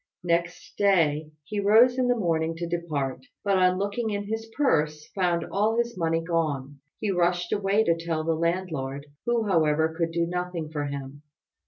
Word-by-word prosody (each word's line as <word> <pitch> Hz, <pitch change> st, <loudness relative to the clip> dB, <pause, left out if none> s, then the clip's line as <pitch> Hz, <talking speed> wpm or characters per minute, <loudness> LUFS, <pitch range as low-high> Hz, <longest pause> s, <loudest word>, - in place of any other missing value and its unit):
Next 170 Hz, 0 st, -1 dB
day 160 Hz, -7 st, +3 dB
he 205 Hz, +7 st, -4 dB
rose 230 Hz, +5 st, +5 dB
in 250 Hz, -, +2 dB
the 245 Hz, 0 st, +2 dB
morning 165 Hz, -4 st, 0 dB
to 170 Hz, +1 st, -4 dB
depart, 165 Hz, -, -3 dB, 0.2 s
but 200 Hz, -2 st, +2 dB
on 185 Hz, 0 st, +4 dB
looking 205 Hz, +4 st, -1 dB
in 205 Hz, -1 st, -2 dB
his 225 Hz, +2 st, -4 dB
purse 155 Hz, -, +1 dB
found 175 Hz, -3 st, +1 dB
all 215 Hz, +3 st, +1 dB
his 235 Hz, 0 st, 0 dB
money 165 Hz, -2 st, 0 dB
gone. 145 Hz, -5 st, -2 dB, 0.2 s
He 210 Hz, -2 st, 0 dB
rushed 175 Hz, -1 st, +1 dB
away 200 Hz, +2 st, +2 dB
to 170 Hz, -5 st, +2 dB
tell 165 Hz, -1 st, -2 dB
the 165 Hz, +1 st, +1 dB
landlord, 160 Hz, -5 st, -2 dB, 0.2 s
who, 235 Hz, -2 st, +1 dB
however, 160 Hz, -3 st, +2 dB
could 165 Hz, 0 st, 0 dB
do 170 Hz, 0 st, +1 dB
nothing 175 Hz, -2 st, -3 dB
for 145 Hz, -2 st, -2 dB
him. 140 Hz, 0 st, -6 dB
170 Hz, 175 wpm, -26 LUFS, 160-200 Hz, 0.2 s, rose